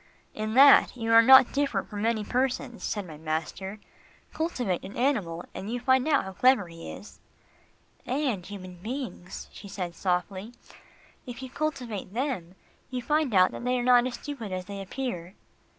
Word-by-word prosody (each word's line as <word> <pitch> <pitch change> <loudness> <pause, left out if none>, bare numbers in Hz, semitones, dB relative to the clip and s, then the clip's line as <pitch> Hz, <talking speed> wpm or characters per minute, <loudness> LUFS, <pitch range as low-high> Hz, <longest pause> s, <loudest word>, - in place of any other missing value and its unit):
"In 215 +1 -3
that 275 -1 +7
you 230 -1 0
are 230 - +9
not 260 +1 +8
different 280 0 0
from 205 -2 -6
many 225 -1 +1
persons," 250 0 -2
said 205 -2 -2
my 155 -3 -10
master. 160 +6 -4 0.6
"Cultivate 250 - -2
an 195 - -9
animal, 205 -11 0
and 200 +4 -6
you 245 - -2
find 260 +2 +2
out 295 -3 +3
how 190 - -7
clever 250 -1 +4
he 165 0 -9
is." 210 - -11 0.9
"And 255 -7 -1
human 185 -2 -9
beings," 220 -3 -6
she 205 - -11
said 180 -3 -5
softly, 190 +5 -2 0.7
"if 245 +1 -7
you 260 - -8
cultivate 250 -10 -4
them, 235 - -3 0.3
you 250 -2 -4
find 300 -1 +1
out 185 0 +6
that - - -7
they 250 +1 +1
are 245 - -1
not 245 0 +5
as 250 - -5
stupid 240 -6 -7
as 185 0 -4
they 200 0 -6
appear." 195 -4 -5
230 Hz, 170 wpm, -27 LUFS, 190-255 Hz, 0.9 s, are